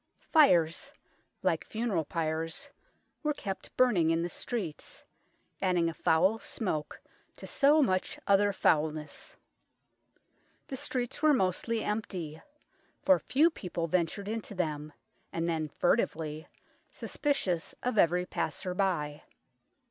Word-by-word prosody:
Fires, 175 - +4 0.5
like - - +1
funeral 215 -8 -1
pyres, 165 - -2 0.5
were 300 -2 0
kept 195 -6 -6
burning 205 -11 +4
in 165 +1 +2
the 175 - -2
streets, 195 -11 -5 0.6
adding 180 -3 +2
a - - -5
foul 180 +7 +3
smoke 155 -12 -3 0.4
to - - -9
so 295 +2 +4
much 185 -6 0
other 200 +1 +4
foulness. 155 -4 0 1.3
The 270 - -6
streets 250 -1 -3
were 305 -2 +5
mostly 220 +3 0
empty, 180 -7 -3 0.6
for 285 -1 +5
few 310 +6 +3
people 175 - -4
ventured 180 +4 -1
into 215 -1 -4
them, 155 -4 -2 0.4
and 165 0 -1
then 160 -2 -1
furtively, 155 -4 0 0.4
suspicious 190 - -1
of 245 -4 +1
every 180 +1 +4
passer 180 0 -3
by. 170 -6 -1
180 Hz, 115 wpm, -30 LUFS, 160-225 Hz, 1.3 s, were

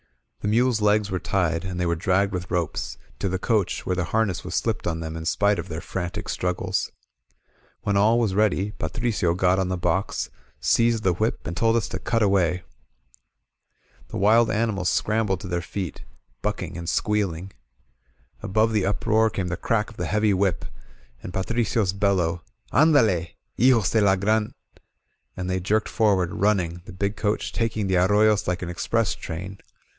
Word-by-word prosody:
The - - -4
mules' 115 +1 +2
legs 105 -1 +2
were 95 - -1
tied, 85 -4 0
and 90 -1 -4
they 90 - +1
were 85 0 +1
dragged 95 +4 +1
with 90 0 -4
ropes; 85 -3 -2 0.2
to 100 - -1
the 95 - -1
coach, 105 0 0
where 90 - 0
the 90 -1 -1
harness 110 -4 0
was - - -5
slipped - - -1
on 80 -1 -1
them 80 0 -5
in 80 0 -6
spite 100 +1 +2
of 85 - -5
their 80 +1 -5
frantic 90 -2 -4
struggles. 90 0 -1 0.9
When 100 - 0
all 105 +4 +4
was 115 -5 +1
ready, 105 -1 +1
Patricio 105 -7 -1
got 90 +1 +2
on 95 - 0
the 95 0 -2
box, 95 +2 -1 0.3
seized 115 -1 +2
the 95 - +3
whip, 110 +7 -2
and 85 - -4
told 115 +3 +2
us 115 - +1
to - - -4
cut 115 -2 0
away. 90 -3 +2 1.4
The - - -6
wild 110 +4 +4
animals 105 -5 0
scrambled 105 -4 0
to - - -7
their 85 -1 -1
feet, 90 -2 -5 0.4
bucking 95 -4 -3
and 85 -1 -4
squealing. 95 -3 -1 0.9
Above 110 +3 +1
the 105 -3 +1
uproar 110 +2 +2
came 95 -4 -3
the 85 - -1
crack 110 -1 0
of 110 - -16
the - - -2
heavy 105 -1 +2
whip, 95 -2 0 0.6
and - - -7
Patricio's 105 0 0
bel 100 0 +2
low: 85 -1 -1 0.3
''Anddlet 115 - +3 0.2
hijos 120 -3 +4
de 110 - +3
la 100 -2 +4
Gran* 105 +3 0 0.2
Ch - - -25 0.3
/" - - -45
and 90 0 -3
they 95 0 0
jerked 105 +4 0
forward, 95 -6 +2
running, 90 -5 +1
the - - -9
big 100 +3 -2
coach 105 0 -1
taking 110 -2 -1
the 95 -1 +1
ar 90 +1 +4
royos 105 +1 +3
like 90 0 -1
an 90 - -4
express 110 +5 0
train. 95 +4 -7
100 Hz, 185 wpm, -24 LUFS, 90-110 Hz, 1.4 s, all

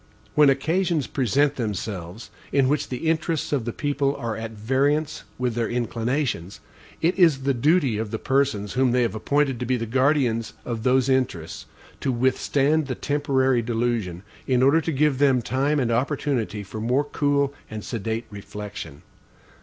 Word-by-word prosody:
When 150 -2 +6
occasions 160 +2 +1
present 140 +3 +1
themselves, 105 -2 -5 0.2
in 135 -1 +3
which 145 +2 0
the 130 +5 -3
interests 160 -1 0
of 130 -6 0
the 120 - -2
people 140 +1 -1
are 115 -2 -3
at 115 +1 -5
variance 135 +8 0
with 125 -1 -1
their 115 -1 -1
inclinations, 120 - -2 0.4
it 175 +4 +2
is 155 -7 +4
the 140 0 +2
duty 135 -3 +2
of 110 -1 -3
the 110 - -3
persons 130 -7 0
whom 130 -1 +2
they 125 0 +3
have 115 - -1
appointed 135 +3 0
to 125 - -2
be 130 0 +1
the 115 - -3
guardians 130 -2 +1
of 115 -2 -3
those 130 +2 +3
interests, 130 -12 -1 0.3
to 135 - 0
withstand 135 +4 +1
the 130 - -3
temporary 135 -4 +1
delusion, 115 -6 -2 0.2
in 130 -1 +3
order 145 +5 +5
to 165 - -2
give 145 -2 +2
them 135 -3 +4
time 140 +5 +1
and 120 -3 0
opportunity 125 -4 -1
for 105 +3 -7
more 125 +5 +2
cool 145 -1 0 0.2
and 110 -1 -6
sedate 115 0 -3
reflection. 100 -6 -8
130 Hz, 165 wpm, -24 LUFS, 115-145 Hz, 0.4 s, When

